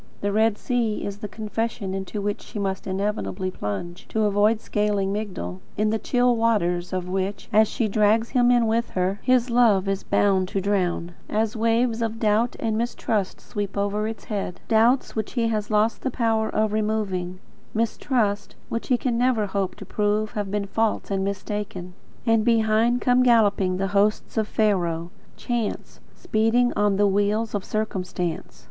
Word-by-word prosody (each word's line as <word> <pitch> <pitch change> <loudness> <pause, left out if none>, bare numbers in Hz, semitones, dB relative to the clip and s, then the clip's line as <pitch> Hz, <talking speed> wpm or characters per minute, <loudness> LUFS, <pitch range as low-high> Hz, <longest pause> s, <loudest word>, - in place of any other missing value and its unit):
The 205 - 0
Red 220 0 +2
Sea 235 -4 -1
is 200 0 -4
the 210 - -5
confession 220 -1 -3
into 195 +2 -4
which 205 0 -2
she - - -9
must 195 -1 -2
inevitably 190 -1 -2
plunge, 175 - -5
to 220 - 0
avoid 210 +2 +3
scaling 205 -2 0
Migdol; 180 - -4 0.2
in 215 +1 +2
the 220 - 0
chill 245 +1 +2
waters 180 -7 +1
of 185 -1 -2
which, 190 +2 -3
as 215 +1 +6
she 230 0 -1
drags 215 +2 +2
him 245 -2 +3
in 240 -1 +4
with 230 +1 0
her, 185 +2 0
his 255 -1 +2
love 220 -5 +4
is 195 0 -1
bound 190 -2 +2
to 195 - -2
drown, 185 -3 0 0.2
as 215 +1 0
waves 230 +1 +1
of 225 -1 -1
doubt 220 +2 +2
and 225 -2 -1
mistrust 220 -4 -1
sweep 205 -1 -5
over 205 +1 0
its 225 0 -6
head, 200 -4 -4
doubts 230 +4 +3
which 220 -1 -3
he 230 -3 +1
has 215 -2 -2
lost 215 +1 +2
the 265 - -1
power 225 -3 0
of 215 -1 0
removing; 205 -4 -1 0.4
mistrust 220 -2 0
which 230 - -3
he 250 - +3
can 240 -1 -1
never 245 -4 +2
hope 195 -1 -2
to - - -10
prove 210 +1 0
to - - -21
have 205 -2 -2
been 205 0 -1
false 220 +1 -1
and 195 -1 0
mistaken. 195 -2 -4 0.3
And 225 -2 +3
behind 230 +1 +3
come 250 0 +4
galloping 205 -6 +3
the 195 0 -1
hosts 205 +1 +1
of 220 -2 +1
Pharaoh; 175 -7 0 0.3
chance, 235 -3 -3 0.2
speeding 225 +3 +2
on 205 -1 +2
the 205 - +4
wheels 205 +3 +1
of 205 -2 -2
circumstance. 180 -6 -3
210 Hz, 175 wpm, -24 LUFS, 195-225 Hz, 0.4 s, as